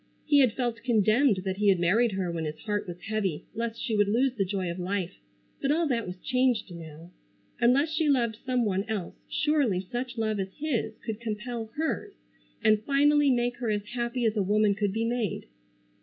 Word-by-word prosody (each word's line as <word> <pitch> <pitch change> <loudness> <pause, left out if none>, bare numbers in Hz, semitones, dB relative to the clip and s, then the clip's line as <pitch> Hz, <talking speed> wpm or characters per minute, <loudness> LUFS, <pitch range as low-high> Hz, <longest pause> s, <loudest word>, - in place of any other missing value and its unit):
He 290 -1 +5
had 255 -5 +4
felt 240 -2 -2
condemned 225 -1 +3
that 190 0 -2
he 210 0 +1
had 190 -3 +4
married 210 +6 +3
her 185 -2 -1
when 165 -1 -3
his 155 0 -4
heart 210 -2 -2
was 175 0 -7
heavy 200 -7 -2
lest 230 0 -3
she 225 - -1
would 205 -1 +3
lose 245 +5 +2
the 215 -6 0
joy 190 -2 -2
of 170 - -6
life, 185 0 -2 0.5
but 275 - 0
all 330 +3 +2
that 230 -5 0
was 180 +1 -6
changed 250 -4 0
now. 165 0 -10 0.5
Unless 260 +6 +3
she 315 -1 +1
loved 235 -5 +2
some 250 -3 +1
one 195 -2 0
else 215 -5 -3 0.2
surely 285 -10 +1
such 240 +6 -5
love 215 -2 0
as 190 0 -4
his 255 -7 -2
could 220 -2 -3
compel 230 +1 -4
hers 320 +1 -2 0.5
and 215 -1 +4
finally 290 +3 +4
make 245 -1 +1
her 235 -2 -2
as 205 -1 -1
happy 240 0 -1
as 220 -1 +2
a 210 - +2
woman 205 +1 +3
could 205 -1 -1
be 225 +3 -1
made. 230 -4 -2
220 Hz, 200 wpm, -28 LUFS, 195-250 Hz, 0.5 s, He